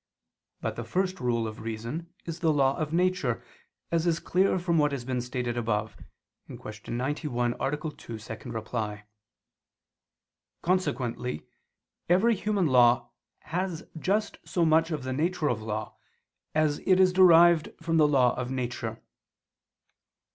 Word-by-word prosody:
But - - -3
the - - -3
first 185 0 -1
rule 120 -3 0
of 110 0 -8
reason 115 +10 -5
is 165 0 -5
the 165 -2 +2
law 135 -2 +3
of 155 -1 -3
nature, 175 -8 +1 0.5
as 170 0 +1
is 170 -1 +2
clear 185 +1 +2
from 170 -2 +1
what 150 -1 +3
has 125 -3 -4
been 125 -1 -1
stated 125 -1 -3
above 110 -2 -1 0.5
(Q. - - -9 0.4
91, 125 -2 -1
A. 140 +2 0
2, 150 -7 -7 0.2
ad 110 0 -6
2). 105 -2 -3 1.7
Consequently 140 - -1 0.6
every 195 +7 +4
human 210 -2 0
law 120 -3 +4 0.3
has 180 -1 -3 0.2
just 210 +5 0
so 170 -2 0
much 160 +1 +4
of 150 -5 -3
the 130 0 -3
nature 160 +2 0
of 110 -3 -1
law, 110 0 -4 0.6
as 155 -1 +2
it 185 -1 +5
is 185 -1 +5
derived 170 -3 +6
from 165 0 0
the 155 -2 +6
law 130 -4 +4
of 125 0 -3
nature. 120 -3 -4
150 Hz, 140 wpm, -28 LUFS, 120-170 Hz, 1.7 s, derived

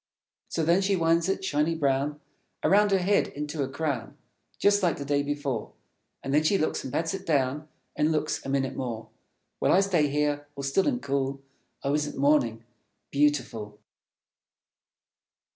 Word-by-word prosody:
So 165 - -1
then 170 +4 +4
she 195 0 +2
winds 165 0 +2
it, 195 0 -1
shiny 155 0 +1
brown, 145 0 0 0.4
Around 205 +2 +4
her 195 - +4
head 190 +2 +2
into 150 +1 -5
a 135 - -1
crown, 140 -3 -3 0.4
Just 205 0 +3
like 175 -4 +1
the 140 - -5
day 145 0 +1
before. 145 -5 -3 0.5
And 135 - -2
then 150 - +5
she 175 +6 +3
looks, 155 - -1
and 130 - -6
pats 165 +5 -1
it 190 0 -5
down, 145 -2 0 0.3
And 150 +1 +2
looks, 155 -1 -1
a - - -6
minute 135 -1 0
more. 115 -3 -5 0.5
While - - +3
I 190 - +6
stay 175 -7 +2
here, 145 0 -1
all 140 - -6
still 140 +8 +1
and 250 -4 0
cool. 135 0 -2 0.4
Oh, 140 - 0
isn't 150 0 -1
Morning 135 -6 +2 0.5
beautiful? 130 -8 0
150 Hz, 165 wpm, -27 LUFS, 135-165 Hz, 0.5 s, I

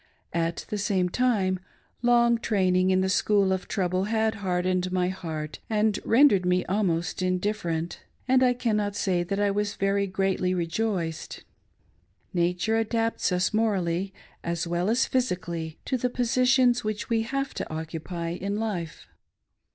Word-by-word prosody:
At 165 0 -1
the 210 - -2
same 190 -3 +1
time, 195 -5 +1 0.4
long 235 -1 +4
training 185 -4 +2
in 185 0 +3
the 190 - +1
school 200 0 +3
of 190 - -3
trouble 185 -1 0
had 220 0 +1
hardened 185 -2 -1
my 180 -1 +1
heart 160 -5 -5
and 215 -1 +1
rendered 230 -6 +5
me 180 0 +1
almost 180 -4 0
indif 185 +3 0
ferent, 165 0 -3 0.3
and 260 0 +4
I 250 -1 +4
cannot 210 -4 0
say 185 -3 +1
tha!t 195 +3 -2
I 205 -1 +2 0.3
very 200 0 +1
greatly 185 -1 0
rejoiced. 170 -1 -2 0.9
Nature 180 +5 +1
adapts 225 -1 0
us 180 +3 +1
morally, 195 -4 0 0.3
as 170 0 -2
well 175 +3 -1
as 240 +3 +3
physically, 170 -10 -2
to 260 - 0
the 250 - 0
positions 250 0 +3
Which 215 -1 -3
we 230 -1 +1
have 275 +4 -2
to - - -5
occupy 160 +2 -4
in 195 +4 -3
life. 195 -8 -4
190 Hz, 145 wpm, -26 LUFS, 180-220 Hz, 0.9 s, rendered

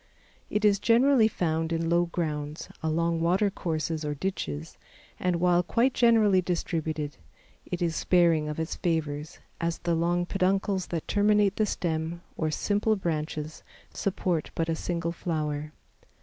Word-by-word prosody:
It 210 0 0
is 200 -1 +4
generally 240 +1 +5
found 165 -5 -1
in 165 0 0
low 170 +1 +3
grounds, 150 -3 -3
along 165 +1 0
water 190 +5 +2
courses 160 -3 -2
or 150 0 -2
ditches, 80 - -4 0.4
and 180 -1 +1
while 175 0 +3
quite 235 +8 +1
generally 220 -5 +4
distributed, 160 -4 -2 0.5
it 180 0 -2
is 165 -1 0
sparing 165 -4 +3
of 150 - -4
its 160 +1 -3
favors, 155 -2 -2 0.2
as 170 0 -1
the 170 -1 -1
long 175 +2 +1
peduncles 190 0 0
that 165 -2 -4
terminate 205 -1 +3
the 215 - +2
stems 165 -2 -2 0.2
or 155 - -1
simple 205 +7 +1
branches, 155 -4 -3 0.3
support 180 -4 -1
but 165 0 -1
a 165 - +1
single 170 0 -2
flower. 155 -3 -3
170 Hz, 145 wpm, -27 LUFS, 160-190 Hz, 0.5 s, generally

